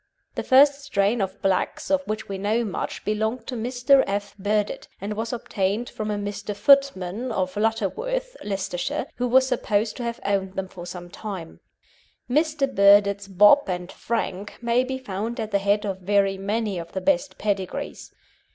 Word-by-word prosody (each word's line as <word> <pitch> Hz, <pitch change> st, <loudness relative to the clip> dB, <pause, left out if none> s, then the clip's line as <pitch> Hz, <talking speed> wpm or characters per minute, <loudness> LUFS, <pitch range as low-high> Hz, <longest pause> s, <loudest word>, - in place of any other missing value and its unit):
The -, -, -3 dB
first 280 Hz, +2 st, +5 dB
strain 210 Hz, -3 st, +1 dB
of 190 Hz, -1 st, -3 dB
blacks 195 Hz, +8 st, 0 dB
of 285 Hz, -1 st, +3 dB
which 215 Hz, 0 st, -3 dB
we 195 Hz, -1 st, -5 dB
know 220 Hz, +4 st, +1 dB
much 200 Hz, -, -4 dB
belonged 220 Hz, +3 st, -1 dB
to 255 Hz, -, -5 dB
Mr. 245 Hz, +3 st, +3 dB
F. 200 Hz, +1 st, -3 dB
Burdett, 205 Hz, +1 st, -1 dB
and 200 Hz, +2 st, -4 dB
was 225 Hz, +2 st, -3 dB
obtained 215 Hz, -1 st, -2 dB
from 215 Hz, 0 st, -4 dB
a 210 Hz, -, 0 dB
Mr. 205 Hz, 0 st, -4 dB
Footman, 245 Hz, -2 st, +3 dB
of 185 Hz, -3 st, -1 dB
Lutterworth, 460 Hz, -, -1 dB
Leicestershire, 190 Hz, -3 st, -2 dB
who 250 Hz, -, 0 dB
was 260 Hz, +2 st, +5 dB
supposed 225 Hz, -4 st, 0 dB
to 245 Hz, -, -4 dB
have 235 Hz, 0 st, -3 dB
owned 195 Hz, -1 st, 0 dB
them 190 Hz, 0 st, -3 dB
for 175 Hz, -2 st, -9 dB
some 175 Hz, 0 st, -8 dB
time. 190 Hz, -6 st, -7 dB, 0.7 s
Mr. 300 Hz, +2 st, +2 dB
Burdett's 200 Hz, 0 st, +5 dB
Bob 205 Hz, +9 st, +6 dB
and 180 Hz, 0 st, -3 dB
Frank 205 Hz, -4 st, -3 dB
may 235 Hz, +1 st, +2 dB
be 260 Hz, 0 st, -3 dB
found 225 Hz, -1 st, -4 dB
at 220 Hz, -1 st, -3 dB
the 200 Hz, -, +2 dB
head 205 Hz, +2 st, +1 dB
of 195 Hz, -2 st, -3 dB
very 195 Hz, +1 st, +2 dB
many 200 Hz, 0 st, -2 dB
of 170 Hz, 0 st, -9 dB
the 190 Hz, -, -2 dB
best 285 Hz, +2 st, +1 dB
pedigrees. 195 Hz, -3 st, -3 dB
210 Hz, 170 wpm, -24 LUFS, 195-245 Hz, 0.7 s, Bob